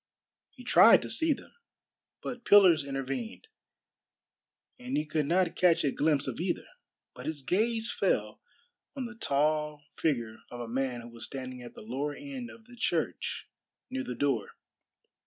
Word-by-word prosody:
He -, -, -14 dB
tried -, -, +7 dB
to -, -, -5 dB
see 325 Hz, -1 st, +2 dB
them, 285 Hz, -, -3 dB, 0.7 s
but 245 Hz, -1 st, -5 dB
pillars 185 Hz, -8 st, +7 dB
intervened, 135 Hz, -, -4 dB, 1.3 s
and 250 Hz, +1 st, -3 dB
he 150 Hz, -, 0 dB
could 150 Hz, -1 st, -1 dB
not 175 Hz, +1 st, +2 dB
catch 175 Hz, -2 st, +4 dB
a 140 Hz, -, +2 dB
glimpse 150 Hz, -1 st, +1 dB
of 130 Hz, 0 st, -4 dB
either. 175 Hz, +1 st, -1 dB, 0.5 s
But -, -, -9 dB
his 150 Hz, -3 st, -4 dB
gaze 225 Hz, -, +1 dB
fell -, -, 0 dB, 0.5 s
on 265 Hz, -2 st, -3 dB
the 235 Hz, -, -7 dB
tall 150 Hz, -5 st, 0 dB
figure 120 Hz, -8 st, -1 dB
of 120 Hz, -, -8 dB
a 120 Hz, -, -5 dB
man 125 Hz, 0 st, -2 dB
who 120 Hz, -, -10 dB
was 115 Hz, -1 st, -7 dB
standing 130 Hz, -2 st, -6 dB
at 120 Hz, -, -10 dB
the -, -, -10 dB
lower 135 Hz, +6 st, -3 dB
end 270 Hz, -4 st, -7 dB
of 225 Hz, -2 st, -14 dB
the 245 Hz, +1 st, -14 dB
church 245 Hz, -, -1 dB, 0.4 s
near 265 Hz, 0 st, -2 dB
the 125 Hz, -, -5 dB
door. 130 Hz, -4 st, 0 dB
150 Hz, 160 wpm, -30 LUFS, 130-225 Hz, 1.3 s, tried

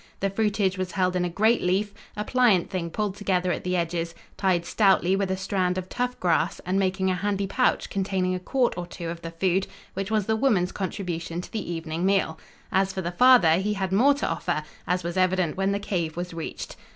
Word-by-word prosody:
The 195 Hz, 0 st, 0 dB
fruitage 200 Hz, -2 st, 0 dB
was 185 Hz, -1 st, -3 dB
held 185 Hz, -1 st, +1 dB
in 180 Hz, -, +1 dB
a 180 Hz, -, 0 dB
great 220 Hz, +7 st, +2 dB
leaf, 195 Hz, +3 st, 0 dB, 0.2 s
a 210 Hz, -, -1 dB
pliant 235 Hz, -9 st, +3 dB
thing 175 Hz, -3 st, -2 dB
pulled 210 Hz, +2 st, -2 dB
together 185 Hz, -3 st, 0 dB
at -, -, -3 dB
the 180 Hz, 0 st, -1 dB
edges, 170 Hz, -1 st, -2 dB, 0.2 s
tied 180 Hz, -3 st, +1 dB
stoutly 190 Hz, -2 st, +3 dB
with 195 Hz, -1 st, -1 dB
a 190 Hz, -, 0 dB
strand 185 Hz, -1 st, 0 dB
of 185 Hz, 0 st, -4 dB
tough 250 Hz, 0 st, -2 dB
grass, 170 Hz, -3 st, +1 dB
and 185 Hz, +2 st, +1 dB
making 190 Hz, 0 st, +1 dB
a -, -, 0 dB
handy 200 Hz, +1 st, -1 dB
pouch 250 Hz, +6 st, +1 dB
containing 190 Hz, -2 st, -1 dB
a 185 Hz, -, -2 dB
quart 250 Hz, +6 st, 0 dB
or 175 Hz, -, -5 dB
two 170 Hz, -1 st, -6 dB
of 170 Hz, 0 st, -6 dB
the 165 Hz, -, -5 dB
food, 185 Hz, +3 st, 0 dB, 0.3 s
which 195 Hz, +1 st, -3 dB
was 215 Hz, -2 st, +1 dB
the 220 Hz, -, +1 dB
woman's 215 Hz, -7 st, +2 dB
contribution 175 Hz, -3 st, -4 dB
to -, -, -11 dB
the 210 Hz, -6 st, -4 dB
evening 165 Hz, 0 st, -3 dB
meal. 190 Hz, -4 st, +1 dB, 0.3 s
As 190 Hz, 0 st, +2 dB
for 190 Hz, -, -4 dB
the 170 Hz, -, -2 dB
father, 180 Hz, -6 st, +6 dB
he 210 Hz, +3 st, -1 dB
had 190 Hz, -2 st, -2 dB
more 260 Hz, +9 st, +5 dB
to 285 Hz, -, -2 dB
offer, 150 Hz, -, -1 dB, 0.2 s
as 180 Hz, 0 st, 0 dB
was 170 Hz, +2 st, -3 dB
evident 185 Hz, -3 st, +2 dB
when 195 Hz, +1 st, +1 dB
the 200 Hz, -, +1 dB
cave 175 Hz, -5 st, -2 dB
was 175 Hz, 0 st, -4 dB
reached. 165 Hz, -1 st, -6 dB
185 Hz, 225 wpm, -26 LUFS, 175-200 Hz, 0.3 s, father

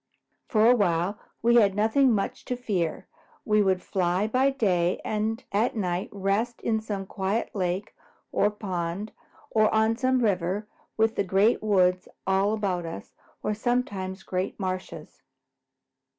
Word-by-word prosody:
For 215 Hz, -1 st, +3 dB
a 245 Hz, -, +7 dB
while 185 Hz, -1 st, +1 dB, 0.2 s
we 235 Hz, +1 st, +5 dB
had 200 Hz, -4 st, +4 dB
nothing 235 Hz, +6 st, +3 dB
much 200 Hz, -3 st, -1 dB
to 250 Hz, -, -2 dB
fear. 190 Hz, -8 st, -2 dB, 0.4 s
We 210 Hz, -1 st, +3 dB
would 190 Hz, -2 st, +1 dB
fly 185 Hz, +1 st, 0 dB
by 255 Hz, +5 st, +2 dB
day 185 Hz, -9 st, +1 dB
and 220 Hz, +2 st, -1 dB
at 215 Hz, +5 st, +1 dB
night 180 Hz, -2 st, -1 dB
rest 205 Hz, +4 st, -1 dB
in 220 Hz, -1 st, +1 dB
some 205 Hz, -3 st, -4 dB
quiet 195 Hz, +3 st, -2 dB
lake 185 Hz, +1 st, -2 dB, 0.4 s
or 205 Hz, -, +3 dB
pond 190 Hz, -1 st, -4 dB, 0.4 s
or 215 Hz, -1 st, +3 dB
on 220 Hz, +1 st, +3 dB
some 255 Hz, 0 st, +2 dB
river, 195 Hz, 0 st, 0 dB, 0.3 s
with 225 Hz, 0 st, +2 dB
the -, -, +2 dB
Great 195 Hz, +5 st, +3 dB
Woods 185 Hz, -4 st, +2 dB, 0.2 s
all 195 Hz, +2 st, +2 dB
about 185 Hz, -5 st, -2 dB
us 100 Hz, -11 st, -8 dB, 0.3 s
or 210 Hz, -, 0 dB
sometimes 205 Hz, -5 st, -2 dB
great 185 Hz, +3 st, -3 dB
marshes. 185 Hz, -1 st, -5 dB
205 Hz, 145 wpm, -26 LUFS, 185-220 Hz, 0.4 s, a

